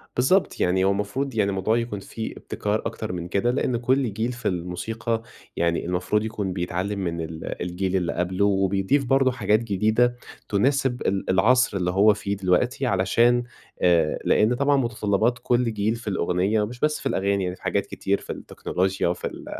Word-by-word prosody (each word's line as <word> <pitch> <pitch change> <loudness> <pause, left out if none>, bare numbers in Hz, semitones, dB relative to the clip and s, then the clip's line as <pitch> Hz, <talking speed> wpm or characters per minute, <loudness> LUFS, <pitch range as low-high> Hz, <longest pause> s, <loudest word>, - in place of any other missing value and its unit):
بالضبط 180 +10 +2
يعني 95 +1 +2
هو 95 - +3
المفروض 110 +6 -2
يعني 100 -2 +2
الموضوع 100 +4 +1
يكون 115 -4 -3
في 110 +3 -6
ابتكار 105 +1 -2
أكتر 110 -3 -4
من 85 -1 -4
كده، 100 +7 +1
لأن 125 -1 0
كل 125 -1 +1
جيل 110 +4 -1
في 120 -2 -4
الموسيقى 95 +6 -2 0.3
يعني 85 0 0
المفروض 90 +4 0
يكون 105 -4 -3
بيتعلم 90 +3 -2
من 85 -3 -2
ال 80 0 -6
الجيل 90 +2 -2
اللي 90 -3 0
قبله 90 +3 0
وبيضيف 95 +6 +2
برضو 135 +1 +3
حاجات 110 -4 +2
جديدة 110 +3 +1 0.3
تُناسب 130 +4 +1
ال 95 0 -1
العصر 110 +3 +3
اللي 90 -1 0
هو 100 +3 +5
فيه 100 -1 -3
دلوقتي، 100 +8 +1
علشان 115 +4 +3 0.4
آآ 85 -3 +3
لأن 110 +3 +3
طبعًا 140 +2 +2
متطلبات 115 -1 0
كل 120 -2 +1
جيل 105 +2 0
في 115 -1 -11
الأغنية 95 +2 +1
مش 120 +3 -9
بس 150 +2 +1
في - - -13
الأغاني 100 -5 0
يعني 90 0 -3
حاجات 100 +1 -1
كتير 100 0 -1
في - - -15
التكنولوچيا 95 +1 -2
وفي 85 - -2
ال - - -9
105 Hz, 175 wpm, -24 LUFS, 95-120 Hz, 0.4 s, هو